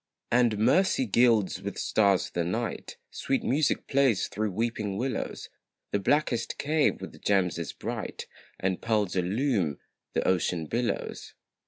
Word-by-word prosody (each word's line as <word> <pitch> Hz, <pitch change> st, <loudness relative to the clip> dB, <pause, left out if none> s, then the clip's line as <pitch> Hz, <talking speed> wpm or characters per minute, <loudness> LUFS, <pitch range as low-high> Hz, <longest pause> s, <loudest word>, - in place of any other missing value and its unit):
And 120 Hz, -3 st, +3 dB
mercy 140 Hz, -, +3 dB
gilds 110 Hz, -4 st, +3 dB
with 100 Hz, +1 st, -5 dB
stars 100 Hz, -3 st, +2 dB
the 85 Hz, -, -1 dB
night; 110 Hz, +7 st, -3 dB
Sweet 135 Hz, -, -1 dB
music 145 Hz, +3 st, +1 dB
plays 135 Hz, -6 st, +2 dB
through 110 Hz, +1 st, -2 dB
weeping 105 Hz, -1 st, -2 dB
willows; 125 Hz, +4 st, -3 dB, 0.4 s
The 100 Hz, -, +1 dB
blackest 120 Hz, +1 st, 0 dB
cave 150 Hz, +1 st, +1 dB
with -, -, -9 dB
gems 95 Hz, -4 st, +1 dB
is 85 Hz, -, -4 dB
bright, -, -, -5 dB, 0.3 s
And 95 Hz, -1 st, -1 dB
pearls 105 Hz, -5 st, 0 dB
illume 95 Hz, -, 0 dB, 0.4 s
the -, -, 0 dB
ocean 90 Hz, -2 st, +1 dB
billows. 120 Hz, +9 st, -3 dB
110 Hz, 135 wpm, -28 LUFS, 95-125 Hz, 0.4 s, And